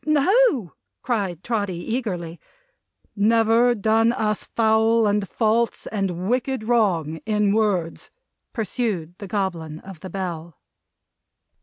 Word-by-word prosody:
"No!" 305 - +3 0.3
cried 195 -8 -2
Trotty, 205 -6 -1
eagerly. 175 -4 -4 0.8
"Never 225 +3 +3
done 225 +2 +3
us 215 -3 -1
foul, 225 0 +3
and 205 -1 0
false, 230 +1 0
and 190 -3 -3
wicked 255 +1 -1
wrong, 190 -10 +1
in 210 -2 +1
words?" 195 -7 0 0.4
pursued 210 -7 -2
the 200 - -7
Goblin 175 -6 -3
of 190 -4 -11
the 185 - -8
Bell. 170 -4 -5
210 Hz, 110 wpm, -23 LUFS, 180-230 Hz, 0.8 s, No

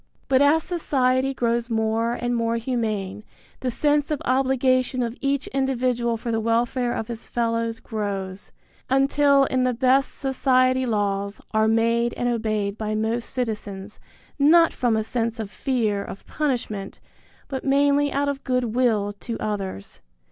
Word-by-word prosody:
But 265 0 +3
as 300 +3 +4
society 265 -6 +1
grows 235 -2 -1
more 225 +1 0
and 245 0 -2
more 230 0 0
humane 215 -4 -2 0.4
the 255 - -2
sense 290 +3 +1
of 300 -3 -1
obligation 255 0 +2
of 235 0 -3
each 275 0 0
individual 250 -3 0
for 235 +1 -4
the 225 - 0
welfare 240 +2 0
of 225 - -3
his 235 -1 -7
fellows 230 -1 -1
grows, 200 -4 -5 0.4
until 275 +1 +4
in 260 -1 +1
the 250 -1 +1
best 265 +2 +2
society 255 -1 +2
laws 200 -2 -1
are 220 0 +2
made 230 +1 +2
and 245 - -1
obeyed 215 -3 -1
by 215 -1 -2
most 225 +2 -1
citizens, 210 -5 -4 0.4
not 330 +4 +6
from 235 -3 +1
a 220 - 0
sense 230 0 -2
of 210 -2 -5
fear 220 -7 -1
of 195 - -9
punishment, 235 -9 -3 0.5
but 265 -1 -4
mainly 285 +1 +3
out 285 +1 0
of 280 -1 -3
goodwill 240 -4 +1
to 230 - -5
others. 195 - -5
240 Hz, 150 wpm, -24 LUFS, 220-265 Hz, 0.5 s, not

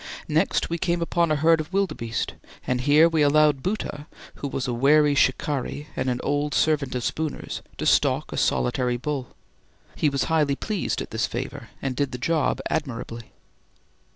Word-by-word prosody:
Next - - +1
we 170 0 -3
came 175 -1 0
upon 170 0 +1
a - - +3
herd 160 +2 +4
of 155 - -9
wildebeeste, 185 -13 -1 0.3
and 125 -1 0
here 145 +5 +6
we 165 -2 +1
allowed 150 -1 +4
Bhoota, 165 -6 -3 0.3
who 145 - -4
was 135 -1 -3
a 125 - -1
wary 145 +4 +4
shikari 145 +1 0
and 130 - -1
an 125 -1 -1
old 145 +1 0
servant 145 -5 +1
of 125 - -2
Spooner's, 155 +4 -3 0.2
to - - -3
stalk - - +2
a - - -4
solitary 120 - +1
bull. 135 0 -4 0.6
He 150 - +2
was 140 -1 0
highly 150 -4 +2
pleased 210 +5 -2
at - - -13
this 110 0 0
favour, 130 +1 -6
and 135 -2 -2
did 140 -1 -1
the - - -3
job 155 +5 0
admirably. 120 -6 -4
145 Hz, 175 wpm, -24 LUFS, 130-155 Hz, 0.6 s, here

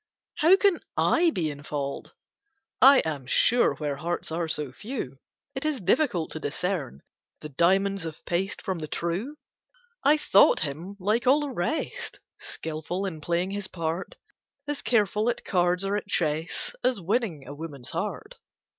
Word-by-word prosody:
How 335 +5 +7
can 390 -3 +3 0.2
I 340 +1 +4
be 165 - -1
in 145 0 -9
fault? 140 -2 -4 0.7
I 270 +1 +8
am 145 -5 -3
sure 240 - +4
where 145 -2 -3
hearts 170 +2 -3
are 165 +1 -1
so 150 -4 -2
few, 140 - -6 0.3
It 265 - -4
is 305 -4 0
difficult 190 - +1
to 160 - -5
discern 150 - -3 0.4
The 150 - -7
diamonds 190 +5 +2
of 160 -1 -7
paste 185 +3 -2
from 190 -4 -2
the 155 - -5
true; 180 - -3 0.7
I 295 +2 +5
thought 200 -9 +5
him 155 +7 -2
like 215 +6 +1
all 280 +4 +6
the 290 -2 -3
rest, 250 - -3 0.2
Skilful 160 +4 -4
in 160 -5 -5
playing 175 +4 0
his 200 -1 -4
part; 165 +1 -4 0.5
As 290 -1 -2
careful 215 -1 +2
at 240 - -3
cards 180 0 +1
or 195 +1 0
at 205 -1 -3
chess, 160 -4 -1
As 250 -3 +2
winning 190 - -1
a 140 - -6
woman's 145 -4 -7
heart. - - -4
180 Hz, 160 wpm, -27 LUFS, 155-225 Hz, 0.7 s, I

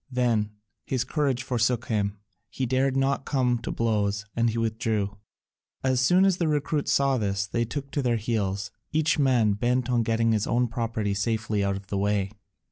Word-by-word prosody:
Then 120 -4 +1 0.3
his 130 -2 -1
courage 135 -2 0
forsook 125 -1 0
him; 105 -4 -1 0.3
he 130 +5 -2
dared 130 +2 +1
not 135 0 +1
come 125 -4 +1
to - - -6
blows 105 -3 0
and 115 0 +2
he 115 - -3
withdrew. 110 -2 -1 0.7
As 130 -1 +2
soon 180 +8 +5
as 190 -2 +3
the 170 - 0
recruits 150 0 0
saw 135 -2 +3
this 100 -2 -1
they 115 +3 -1
took 140 +3 -5
to 145 - 0
their 120 -3 +1
heels, 105 -2 -2 0.2
each 155 0 +2
man 125 -7 +3
bent 125 +3 0
on 120 -1 +3
getting 115 0 +1
his 110 -2 +1
own 125 +1 +2
property 115 -3 -2
safely 110 0 -1
out 100 0 0
of 95 0 -7
the 100 0 -2
way. 100 -1 0
115 Hz, 185 wpm, -26 LUFS, 105-130 Hz, 0.7 s, soon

